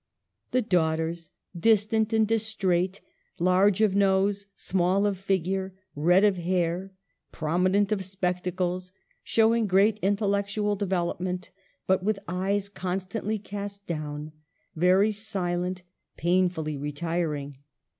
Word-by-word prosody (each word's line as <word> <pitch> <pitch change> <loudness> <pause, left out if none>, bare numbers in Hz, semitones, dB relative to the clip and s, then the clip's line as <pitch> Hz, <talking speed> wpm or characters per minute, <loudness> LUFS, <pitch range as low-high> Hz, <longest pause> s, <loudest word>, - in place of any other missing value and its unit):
The 255 - +1
daughters 165 -3 0 0.2
— - - -34
distant 220 +1 +3
and 220 -1 +3
distrait, 200 -4 0 0.4
large 190 +3 +3
of 215 -3 +4
nose, 200 0 +2
small 190 +2 +1
of 205 -1 +1
figure, 190 0 -1 0.2
red 175 +6 +4
of 205 -3 +4
hair 175 +1 -1 0.2
(!), - - -51
prominent 185 +6 +1
of 200 -3 0
spectacles; 180 -1 -2 0.3
showing 225 0 +3
great 200 +3 +3
intellectual 205 +1 0
development, 185 -2 -2 0.3
but 190 0 +2
with 210 +2 0
eyes 190 +3 -1
constantly 195 +3 -3
cast 200 0 -7
down, 150 -2 -5 0.4
very 185 +5 +4
silent, 185 -4 -3 0.3
painfully 175 -3 +1
retiring. 150 -2 -3
190 Hz, 110 wpm, -27 LUFS, 175-205 Hz, 0.4 s, of